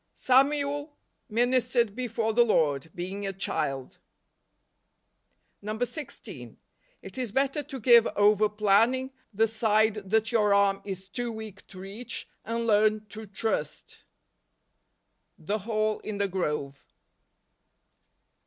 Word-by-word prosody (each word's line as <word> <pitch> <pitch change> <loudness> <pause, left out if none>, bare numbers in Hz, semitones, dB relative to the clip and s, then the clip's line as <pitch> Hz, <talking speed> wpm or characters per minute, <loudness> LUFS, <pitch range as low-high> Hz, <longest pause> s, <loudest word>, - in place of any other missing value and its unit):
" - - -49
Samuel 285 +2 +1 0.3
ministered 240 -1 +1
before 230 -3 -2
the 240 - +4
Lord, 155 - +1
being 195 +3 -4
a - - -1
child." 135 -8 -3 1.6
16. 245 +8 -5 0.5
It - - -8
is 245 -5 -3
better 275 +4 0
to 275 -2 -8
give 235 0 +6
over 210 +1 +4
planning 225 +6 +2 0.2
the 220 +2 +2
side 220 0 +2 0.2
that 220 +2 +2
your 210 -3 +3
arm 200 -1 +3
is 190 -1 -7
too 240 +4 -4
weak 220 -3 -9
to 185 - -11
reach, 215 +5 -6 0.2
and 230 +1 -2
learn 215 0 +3
to 220 0 -9
trust. 200 -6 -4 1.3
The 205 +7 -3
Hall 215 +1 -1
in 215 -1 -6
the 200 0 +1
Grove. 150 -7 -3
215 Hz, 115 wpm, -27 LUFS, 200-240 Hz, 1.6 s, give